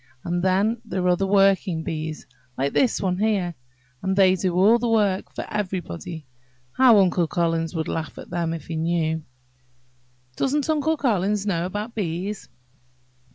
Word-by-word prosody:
And 175 Hz, 0 st, -1 dB
then 200 Hz, +5 st, +1 dB
there 185 Hz, -5 st, -2 dB
are 180 Hz, -, +4 dB
the 195 Hz, +2 st, -1 dB
working 195 Hz, -4 st, +3 dB
bees, 155 Hz, -2 st, -5 dB, 0.3 s
like 140 Hz, +2 st, -1 dB
this 255 Hz, -4 st, +2 dB
one 185 Hz, -1 st, 0 dB
here, 200 Hz, -5 st, +1 dB, 0.5 s
and 190 Hz, 0 st, -1 dB
they 190 Hz, -1 st, +5 dB
do 185 Hz, -1 st, -1 dB
all 210 Hz, +6 st, +5 dB
the 240 Hz, 0 st, -1 dB
work 205 Hz, -4 st, +1 dB
for -, -, -4 dB
everybody. 180 Hz, -5 st, -4 dB, 0.5 s
How 250 Hz, -, +6 dB
Uncle 180 Hz, -3 st, +3 dB
Collins 165 Hz, 0 st, -1 dB
would 160 Hz, -1 st, -2 dB
laugh 160 Hz, -1 st, -4 dB
at -, -, -10 dB
them, 170 Hz, -2 st, -1 dB
if 165 Hz, -3 st, -5 dB
he 165 Hz, -, -5 dB
knew!" 160 Hz, 0 st, 0 dB, 1.1 s
"Doesn't 285 Hz, -, 0 dB
Uncle 315 Hz, +1 st, +1 dB
Collins 205 Hz, -6 st, 0 dB
know 175 Hz, -4 st, 0 dB
about 210 Hz, +5 st, -5 dB
bees?" 190 Hz, +1 st, -4 dB
185 Hz, 155 wpm, -23 LUFS, 170-210 Hz, 1.1 s, How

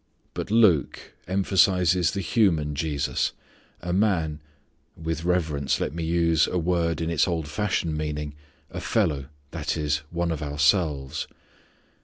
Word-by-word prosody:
But -, -, -5 dB
Luke 105 Hz, -9 st, +2 dB
emphasizes 90 Hz, -2 st, +3 dB
the 100 Hz, -, -3 dB
human 85 Hz, -7 st, +2 dB
Jesus, 75 Hz, -1 st, -1 dB, 0.5 s
a 90 Hz, 0 st, -3 dB
Man 85 Hz, -7 st, +1 dB, 0.6 s
with 80 Hz, 0 st, -3 dB
reverence 80 Hz, -6 st, 0 dB
let -, -, -2 dB
me 85 Hz, 0 st, -4 dB
use 85 Hz, -1 st, +2 dB
a 90 Hz, -, -1 dB
word 85 Hz, -1 st, 0 dB
in 80 Hz, 0 st, -1 dB
its 80 Hz, +1 st, +2 dB
old 80 Hz, -4 st, -2 dB
fashioned 85 Hz, -1 st, -1 dB
meaning 75 Hz, -1 st, -3 dB, 0.4 s
a -, -, -5 dB
fellow, 70 Hz, -4 st, 0 dB, 0.2 s
that -, -, -2 dB
is, 75 Hz, -1 st, +1 dB
one 85 Hz, 0 st, -1 dB
of 80 Hz, -2 st, -3 dB
ourselves. 75 Hz, -1 st, +1 dB
80 Hz, 135 wpm, -25 LUFS, 75-90 Hz, 0.6 s, emphasizes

